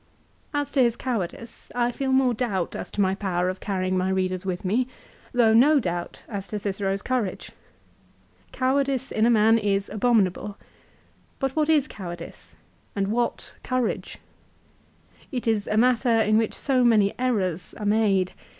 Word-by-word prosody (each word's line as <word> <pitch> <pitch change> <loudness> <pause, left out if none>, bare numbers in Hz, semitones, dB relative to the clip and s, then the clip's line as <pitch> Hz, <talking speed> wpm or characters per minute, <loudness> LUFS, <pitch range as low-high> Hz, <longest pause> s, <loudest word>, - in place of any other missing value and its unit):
As 290 -1 -2
to 275 - +2
his 235 -2 +3
cowardice 230 -2 -5
I 240 0 +1
feel 265 +1 -2
more 260 -2 +3
doubt 210 -7 -2
as - - -5
to 205 - -2
my 190 -1 +2
power 185 -2 -1
of 185 - -4
carrying 185 -2 -1
my 185 0 +1
readers 185 0 -1
with 180 0 -3
me, 235 +7 +1 0.4
though 235 -3 +4
no 285 +6 +6
doubt 175 -6 -4
as 200 -3 -5
to 210 - -4
Cicero's 195 -1 -2
courage. 245 -7 -2 1.0
Cowardice 265 0 0
in 220 +1 +2
a - - +4
man 225 0 +5
is 200 -2 0
abominable. 210 -3 +1 0.8
But 270 -1 -2
what 310 0 +1
is 300 -3 +4
cowardice? 175 -3 -9 0.4
and 195 -1 0
what 240 +2 -2
courage? 255 -2 -2 1.1
It 250 -4 -3
is 220 -2 +1
a 215 - 0
matter 245 +1 +3
'in 220 -2 +3
which 225 - -1
so 260 -3 +1
many 215 -4 +4
errors 190 -9 -1
are 210 - -5
made 205 -3 +2
220 Hz, 160 wpm, -25 LUFS, 195-250 Hz, 1.1 s, no